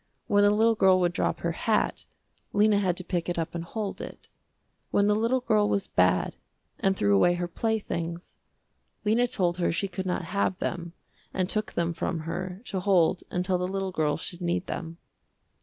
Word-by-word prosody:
When 205 0 +3
the 205 - +6
little 220 +2 +4
girl 190 -3 +4
would 175 -1 +1
drop - - -1
her 170 - 0
hat, 215 +6 0 0.5
Lena 205 0 +4
had 180 -3 0
to 185 - -2
pick 175 -2 -2
it 175 - -2
up 165 -1 -2
and 170 -1 -3
hold 205 +3 -4
it. - - -9 0.6
When 200 - +3
the 210 - +4
little 230 +4 +1
girl 210 -3 +2
was 200 -1 +1
bad - - +2 0.4
and 195 -2 +1
threw 100 0 +3
away 175 - +4
her 175 0 -2
playthings, 175 -4 -3 0.7
Lena 230 +4 +3
told 180 -6 0
her 175 - +1
she 195 +4 -1
could 190 0 -5
not 180 0 -1
have 190 +1 0
them 170 -1 -4 0.4
and 185 -1 +1
took 215 +2 -1
them 170 0 0
from 165 0 -2
her 180 +5 -5
to 190 - -2
hold 185 -2 +3
until 180 0 0
the 180 - -1
little 195 0 -2
girl 150 -4 0
should 175 +3 -6
need 175 +1 -1
them. 165 0 -5
185 Hz, 190 wpm, -27 LUFS, 170-205 Hz, 0.7 s, the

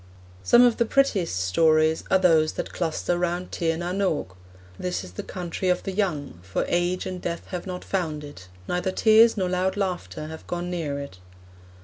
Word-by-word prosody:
Some 240 - +6
of 240 -2 +4
the 235 - +2
prettiest 220 - +1
stories 155 - +3
are - - +5
those 160 -4 +3
that - - -5
cluster 175 +1 -1
round 175 +1 -2
Tir 165 -1 0
na 175 +1 -3
n 190 +2 -2
Og. 150 - -1 0.4
This 90 +1 -2
is 90 - -10
the 90 - -5
Country 180 +1 -4
of 180 - +1
the 195 - -3
Young, 165 - -2
'for 95 +1 -2
age 175 +1 0
and 185 -1 -5
death 170 -1 -4
have 180 0 -5
not 180 -1 -6
found 160 -6 -2
it; 145 -11 -11 0.2
neither 180 +1 -1
tears 220 +3 +5
nor 185 -2 +1
loud 185 +2 0
laughter 180 -5 -3
have 160 +1 -9
gone 175 0 -3
near 155 -5 -2
it.' 140 -10 -8
175 Hz, 195 wpm, -25 LUFS, 155-185 Hz, 0.4 s, Some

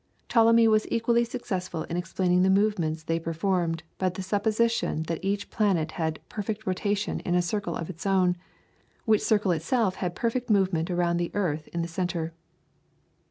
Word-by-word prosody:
Ptolemy 230 -1 +5
was 215 -1 +3
equally 235 +1 +2
successful 190 -9 -4
in 170 - -5
explaining 180 +1 +1
the 190 - +4
movements 190 -6 +1
they 165 +1 -1
performed 165 0 -1 0.2
by 185 - +2
the 185 +1 -6
supposition 215 -2 +1
that 165 +2 -4
each 200 +1 -2
planet 185 -7 +1
had 160 -2 -2
perfect 215 +1 -4
rotation 200 +2 -1
in 175 -3 -1
a 180 - +4
circle 200 -2 -2
of 165 - -4
its 185 +1 -6
own, 185 -2 +3 0.7
which 220 -3 +4
circle 210 -3 +2
itself 185 +5 0
had 180 -2 -3
perfect 245 +3 -1
movement 190 -5 +2
around 175 -1 +1
the 175 0 -1
earth 160 -7 -1
in 170 -1 -3
the - - -3
centre. 170 -1 -3
185 Hz, 165 wpm, -27 LUFS, 170-210 Hz, 0.7 s, Ptolemy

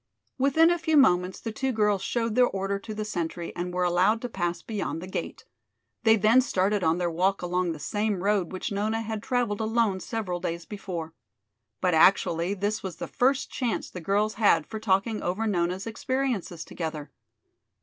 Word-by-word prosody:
Within 315 +5 +5
a 345 - +1
few 320 -1 +2
moments 180 -8 +4
the 225 - -5
two 265 +4 -1
girls 210 -4 +1
showed 230 +1 -1
their 250 +1 +5
order 195 -1 -2
to 215 +2 -7
the 215 0 -3
sentry 170 -4 -4
and 180 0 -3
were 180 0 0
allowed 180 +5 +3
to 245 - -3
pass 175 -5 -2
beyond 205 -6 -3
the 175 - -7
gate. 185 - -5 0.6
They 225 0 +7
then 225 +4 +5
started 200 -5 0
on 160 +1 +2
their 175 -1 -1
walk 185 +3 +1
along 180 0 0
the - - -8
same 205 +4 -2
road 200 -4 +1
which 185 +2 -4
Nona 215 +3 -1
had 220 -1 -4
traveled 235 -4 -1
alone 220 -3 +1
several 185 -3 -3
days 170 -1 -4
before. 175 -5 -6 0.7
But 180 -2 +2
actually 170 +2 +4
this 205 +2 -1
was 190 -3 -5
the - - -6
first 265 +1 +1
chance 245 -4 -2
the 180 - -7
girls 205 +5 +1
had 205 - +4
for 220 - -6
talking 215 +1 +1
over 185 +6 -1
Nona's 180 -2 0
experiences 230 -7 -2
together. 155 -3 -5
200 Hz, 185 wpm, -27 LUFS, 180-225 Hz, 0.7 s, They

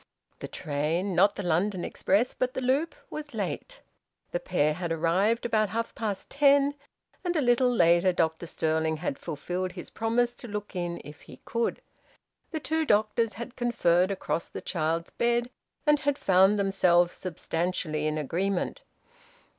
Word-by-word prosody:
The - - -5
train 160 +5 -2
not 195 +4 +4
the 205 - -4
London 180 +2 0
express, 210 +6 +1
but 255 +1 -2
the - - -1
loop 275 +6 +1 0.2
was 300 -1 -7
late. - - -4 0.5
The - - -1
pair 155 - +1
had 170 +1 -4
arrived 180 +9 +1
about 215 -3 +2
half 230 +1 -3
past 210 -4 -4
ten, 280 0 +4 0.5
and 355 -1 -1
a - - +3
little 250 -1 +3
later 175 -4 +4
Dr 165 -1 0
Stirling 160 0 0
had 155 -3 -3
fulfilled 180 +4 -4
his 175 -2 -8
promise 235 +2 +1
to 245 - -8
look 205 -2 -6
in 175 -1 -3
if 150 0 -11
he 130 - -14
could. 230 0 -1 0.7
The 315 - -3
two 320 +1 0
doctors 215 -2 +2
had 235 +4 -7
conferred 185 -7 +2
across 185 -3 -2
the - - -6
child's 165 -1 -2
bed, 240 +1 0 0.3
and 295 -1 +4
had 285 -1 0
found 190 0 +4
themselves 180 -3 +3
substantially 165 -3 -2
in 155 0 -1
agreement. 180 - -1
195 Hz, 155 wpm, -28 LUFS, 170-240 Hz, 0.7 s, not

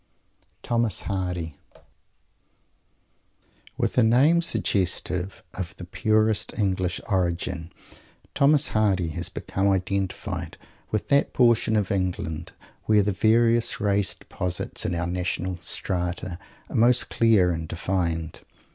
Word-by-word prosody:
THOMAS 115 -2 0
HARDY 90 -5 -3 2.2
With - - 0
a - - +5
name 135 +9 +4
suggestive 95 - 0
of 95 0 -6
the - - -8
purest 110 +4 +1
English 95 -3 0
origin, 90 -3 -1 0.6
Mr. 140 -1 +4
Hardy 95 -6 +1
has 80 - -5
become 95 +1 -1
identified 95 0 -2 0.3
with 110 - -2
that 140 0 +3
portion 120 -3 +3
of 105 -1 0
England 90 -4 -3 0.3
where 105 -2 +4
the 105 - 0
various 115 +3 +2
race 100 -1 +1
deposits 90 -1 -4
in 90 - -1
our 85 +1 -1
national 90 +1 -2
"strata" 90 0 -2 0.3
are - - -9
most 120 +2 +4
dear 110 -6 +5
and 80 -1 -4
defined. 85 -2 -2
95 Hz, 110 wpm, -25 LUFS, 90-110 Hz, 2.2 s, a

